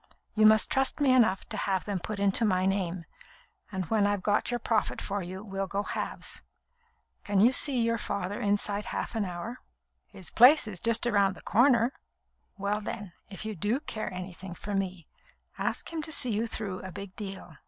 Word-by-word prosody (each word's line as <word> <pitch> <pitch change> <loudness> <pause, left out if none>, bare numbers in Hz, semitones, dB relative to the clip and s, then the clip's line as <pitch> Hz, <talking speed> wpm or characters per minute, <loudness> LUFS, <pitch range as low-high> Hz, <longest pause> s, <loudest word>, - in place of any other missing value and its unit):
You 215 0 +6
must 215 0 +4
trust 270 +2 +1
me 275 -3 +4
enough 220 -7 +3
to - - -4
have 190 -2 -1
them 200 -3 -2
put 210 +3 -5
into 200 +3 +2
my 185 -4 +2
name, 185 -3 -1 0.7
and 190 -2 -3
when 210 -2 +3
I've 205 -2 -1
got 210 0 +1
your 240 0 -1
profit 225 -2 0
for 200 0 -3
you, 185 +2 -7
we'll 195 -2 -3
go 200 +2 -2
halves. - - -3 0.8
Can 205 -1 +1
you 230 +5 +6
see 265 -1 +4
your 230 0 +1
father 200 -1 -3
inside 205 0 0
half - - -4
an 220 -3 -1
hour?" 180 +7 -6 0.5
"His 185 -4 -10
place 255 +3 +7
is 190 -5 -5
just 230 +3 +2
round 200 -5 +2
the - - -13
corner." 245 +1 +4 0.6
"Well, 205 +1 -1
then, 205 -3 -6 0.2
if 200 +2 -7
you 220 - -3
do 210 - 0
care 225 -9 -5
anything 185 0 -7
for 205 - -6
me, 185 -4 -3 0.5
ask - - -2
him 320 - -2
to 315 - -5
see 255 -5 +4
you 220 +2 0
through 205 -4 -3
a 190 - -8
big 200 +1 -8
deal. 195 -6 -8
205 Hz, 195 wpm, -29 LUFS, 190-225 Hz, 0.8 s, place